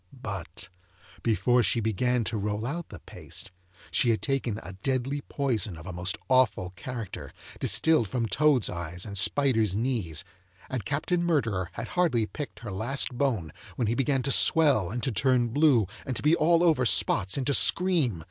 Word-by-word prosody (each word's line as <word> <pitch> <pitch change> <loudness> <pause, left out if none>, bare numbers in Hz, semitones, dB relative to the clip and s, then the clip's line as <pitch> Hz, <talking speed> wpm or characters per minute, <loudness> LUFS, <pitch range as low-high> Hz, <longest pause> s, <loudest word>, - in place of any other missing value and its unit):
But 95 -3 -6 0.5
before 120 +2 +2
she 115 +2 +1
began 115 +3 0
to 110 - -2
roll 105 +1 -2
out 165 +6 -4
the - - -9
paste - - -8 0.4
she 125 - +2
had 110 -3 +2
taken 125 -2 -2
a 95 - -8
deadly 135 +2 -1
poison 115 - -1
of 80 - -11
a 90 - -6
most 90 +2 -2
awful 125 -8 +2
character, 115 +2 -7 0.3
distilled 160 -9 +2
from 120 +2 -2
toads' 130 +3 +3
eyes 85 0 -4
and 100 -2 -7
spiders' 110 -1 +2
knees; 105 - -2 0.5
and 125 -5 -3
Captain 170 +5 -1
Murderer 115 - 0
had - - -6
hardly 160 -11 +1
picked 145 +5 -8
her 115 -4 -6
last 120 +9 -2
bone, 120 - -2 0.2
when 120 - -1
he 110 - 0
began 135 +1 0
to 135 - 0
swell, 140 - +4
and 120 +4 -4
to 135 - 0
turn 125 +1 +2
blue, 135 -4 +3 0.2
and 130 -3 -4
to - - -6
be 155 +3 +4
all 170 +2 +3
over 160 -7 +3
spots, 100 -4 +2
and 135 - -2
to 140 - +2
scream. 160 - +3
120 Hz, 175 wpm, -27 LUFS, 105-140 Hz, 0.5 s, swell